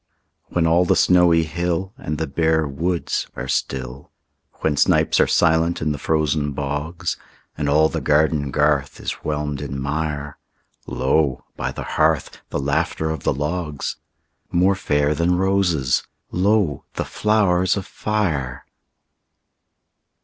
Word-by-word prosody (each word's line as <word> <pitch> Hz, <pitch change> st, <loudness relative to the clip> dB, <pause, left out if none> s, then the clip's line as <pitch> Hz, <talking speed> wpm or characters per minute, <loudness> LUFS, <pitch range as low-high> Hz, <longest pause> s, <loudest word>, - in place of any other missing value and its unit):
When 85 Hz, -2 st, 0 dB
all 85 Hz, +2 st, +4 dB
the 90 Hz, -, +2 dB
snowy 90 Hz, -2 st, +5 dB
hill 85 Hz, +4 st, -2 dB
And 130 Hz, -, -4 dB
the 80 Hz, -, -1 dB
bare 80 Hz, +1 st, +1 dB
woods 85 Hz, +5 st, -2 dB
are 65 Hz, -, -5 dB
still; 65 Hz, +1 st, -3 dB, 0.5 s
When 75 Hz, -2 st, +1 dB
snipes -, -, +3 dB
are -, -, +5 dB
silent 80 Hz, +1 st, +2 dB
in 75 Hz, 0 st, 0 dB
the 70 Hz, -, -4 dB
frozen 75 Hz, -2 st, 0 dB
bogs, 75 Hz, +6 st, -3 dB, 0.4 s
And 75 Hz, -1 st, -1 dB
all 75 Hz, +2 st, +5 dB
the -, -, -4 dB
garden 75 Hz, -1 st, +2 dB
garth 75 Hz, -1 st, +1 dB
is -, -, -3 dB
whelmed 75 Hz, -2 st, -2 dB
in 70 Hz, -1 st, -4 dB
mire, 75 Hz, 0 st, -3 dB, 0.5 s
Lo, 65 Hz, 0 st, 0 dB
by -, -, -3 dB
the -, -, -6 dB, 0.2 s
hearth, -, -, +1 dB
the -, -, -2 dB
laughter 80 Hz, +3 st, -1 dB
of 80 Hz, -3 st, -4 dB
the -, -, +1 dB
logs— 75 Hz, +1 st, -3 dB, 0.5 s
More 90 Hz, +3 st, +3 dB
fair 75 Hz, -6 st, +1 dB
than 85 Hz, +3 st, +1 dB
roses, 90 Hz, -8 st, +2 dB, 0.3 s
lo, 95 Hz, -5 st, +1 dB
the -, -, -2 dB
flowers 100 Hz, -4 st, +2 dB
of 95 Hz, -, -4 dB
fire! 80 Hz, -16 st, -2 dB
80 Hz, 135 wpm, -21 LUFS, 70-90 Hz, 0.5 s, snowy